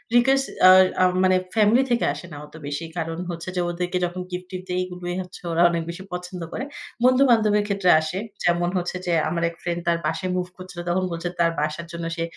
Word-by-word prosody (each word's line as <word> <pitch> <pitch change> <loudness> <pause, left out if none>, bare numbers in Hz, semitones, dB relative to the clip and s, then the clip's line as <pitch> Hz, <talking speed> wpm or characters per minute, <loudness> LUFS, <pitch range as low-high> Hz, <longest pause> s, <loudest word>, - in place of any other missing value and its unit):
Request 270 +3 +4 0.2
আ - - +10 0.3
আম 185 - +5
মানে 185 0 +4 0.2
family 220 +4 +5
থেকে 235 - +2
আসে 145 +3 -9
না 145 - -8
অত 150 - -19
বেশি। 145 +3 -3
কারণ 165 0 -3
হচ্ছে 170 +1 -5
যে, 180 - +1
ওদেরকে 180 +1 -2
যখন 175 +1 -5
গিফট-টিফ্ট 185 +1 -6
দেয় 180 0 0
এগুলোই 180 -1 -5
হচ্ছে 180 0 -10
ওরা 165 - +2
অনেক 170 -1 -1
বেশি 175 +3 -6
পছন্দ 180 0 -6
করে। 245 - -3 0.4
বন্ধু-বান্ধবের 235 -5 +4
ক্ষেত্রে 195 -3 +1
আসে। 155 +4 -4 0.3
যেমন 175 0 +2
হচ্ছে 180 0 -2
যে, 175 - 0 0.2
আমার 170 0 -1
এক 170 - -12
ফ্রেন্ড 175 0 -2
তার 170 - +3
বাসায় 180 +4 -1
মুভ 180 - -1
করছিল। 185 -1 -9
তখন 185 +2 +1
বলছে 170 +1 -3
তার 170 -1 +4
বাসার 155 +2 -2
জন্য 170 0 -5
সে 165 - -2
180 Hz, 210 wpm, -23 LUFS, 170-185 Hz, 0.4 s, আ